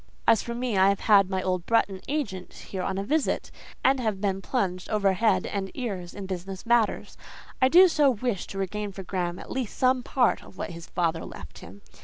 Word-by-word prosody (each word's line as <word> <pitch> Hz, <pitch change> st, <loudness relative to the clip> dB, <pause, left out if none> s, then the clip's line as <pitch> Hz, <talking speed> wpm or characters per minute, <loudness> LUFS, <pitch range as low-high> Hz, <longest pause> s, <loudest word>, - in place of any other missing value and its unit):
"As 225 Hz, -2 st, +5 dB
for 235 Hz, -, -5 dB
me, 240 Hz, -5 st, -1 dB
I 190 Hz, +1 st, +6 dB
have 200 Hz, -, 0 dB
had 200 Hz, -3 st, +5 dB
my 190 Hz, -1 st, -1 dB
old 185 Hz, -2 st, -1 dB
Bretton 200 Hz, -5 st, +1 dB
agent 230 Hz, -11 st, -3 dB
here 190 Hz, -, -6 dB
on 190 Hz, +1 st, -2 dB
a 195 Hz, -, -1 dB
visit, 300 Hz, +8 st, 0 dB, 0.3 s
and 265 Hz, 0 st, +4 dB
have 215 Hz, -5 st, -1 dB
been 195 Hz, -1 st, -1 dB
plunged 185 Hz, -7 st, -2 dB
overhead 205 Hz, +1 st, +2 dB
and 195 Hz, -1 st, -3 dB
ears 195 Hz, -9 st, -5 dB
in 200 Hz, -, -6 dB
business 190 Hz, +1 st, -6 dB
matters. 235 Hz, -2 st, +1 dB, 0.4 s
I 260 Hz, -, +6 dB
do 360 Hz, +7 st, +8 dB
so 300 Hz, -5 st, +3 dB
wish 240 Hz, -4 st, -2 dB
to 195 Hz, -, -8 dB
regain 205 Hz, +2 st, -3 dB
for 195 Hz, -, -7 dB
Graham 175 Hz, -1 st, -2 dB
at -, -, -10 dB
least 260 Hz, -5 st, -3 dB
some 255 Hz, 0 st, +3 dB
part 245 Hz, 0 st, +1 dB
of -, -, -15 dB
what -, -, -4 dB
his 170 Hz, 0 st, -9 dB
father 165 Hz, -2 st, -1 dB
left -, -, -10 dB
him. 95 Hz, +4 st, -13 dB
200 Hz, 210 wpm, -26 LUFS, 185-240 Hz, 0.4 s, do